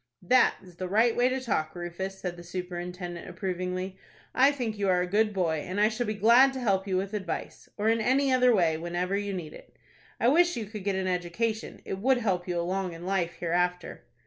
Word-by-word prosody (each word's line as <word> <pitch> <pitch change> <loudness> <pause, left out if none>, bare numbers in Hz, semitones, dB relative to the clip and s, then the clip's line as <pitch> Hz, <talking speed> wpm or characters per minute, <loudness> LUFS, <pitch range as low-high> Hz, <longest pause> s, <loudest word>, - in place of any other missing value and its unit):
"That 255 +8 +4
is 180 -2 -16
the 185 - -3
right 225 +5 +3
way 245 +1 +3
to 260 +1 -1
talk, 185 -11 -2
Rufus," 175 +2 -5
said 180 -2 -4
the 175 - -11
superintendent, 175 0 -6
approvingly. 185 0 -4 0.4
"I 270 +2 +5
think 245 -6 -3
you 200 -1 +1
are 180 -1 +3
a - - 0
good 210 +4 +2
boy, 175 -5 0
and 185 +6 -4
I 210 +1 +5
shall 235 +1 -3
be 215 - -2
glad 235 +6 +6
to 265 - -4
help 200 -5 +1
you 185 -1 0
with 195 +2 -3
advice, 190 -5 -5
or 210 +1 0
in 225 0 +3
any 265 +3 +2
other 250 -1 +5
way, 170 -7 +3
whenever 175 +3 -2
you 205 0 -2
need 175 -5 -5
it. - - -15 0.4
I - - +2
wish 345 +6 +4
you 225 - -3
could 210 -1 -8
get 200 -1 0
an 190 0 -1
education; 185 +5 -2
it 190 - -4
would 260 +5 +3
help 190 -7 -1
you 175 -1 -1
along 185 +1 -2
in 165 +1 -9
life 185 -3 0
hereafter." 180 +1 -1
190 Hz, 225 wpm, -28 LUFS, 180-225 Hz, 0.4 s, glad